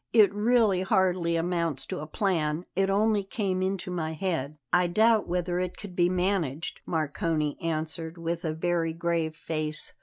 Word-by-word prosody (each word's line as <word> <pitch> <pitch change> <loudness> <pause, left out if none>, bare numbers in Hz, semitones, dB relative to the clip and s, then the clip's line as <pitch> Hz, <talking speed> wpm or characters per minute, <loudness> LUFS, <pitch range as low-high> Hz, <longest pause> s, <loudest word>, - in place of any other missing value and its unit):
It 215 -3 +6
really 210 -3 +3
hardly 185 -4 +2
amounts 165 -4 0
to - - -4
a 150 - -6
plan; 165 -3 0
it 195 +1 +2
only 205 +1 +2
came 195 -2 -2
into 190 -1 -2
my 160 -3 -2
head." 155 -4 -2 0.2
"I 180 0 +5
doubt 220 +4 +3
whether 175 0 -1
it 180 -1 -3
could 200 -4 -9
be 175 0 +3
managed," 180 -5 -1
Marcone 155 -1 -1
answered 160 +1 -3
with 170 0 -3
a 160 - 0
very 165 0 0
grave 165 -1 -1
face. 155 -1 -4
175 Hz, 160 wpm, -28 LUFS, 160-190 Hz, 0.2 s, It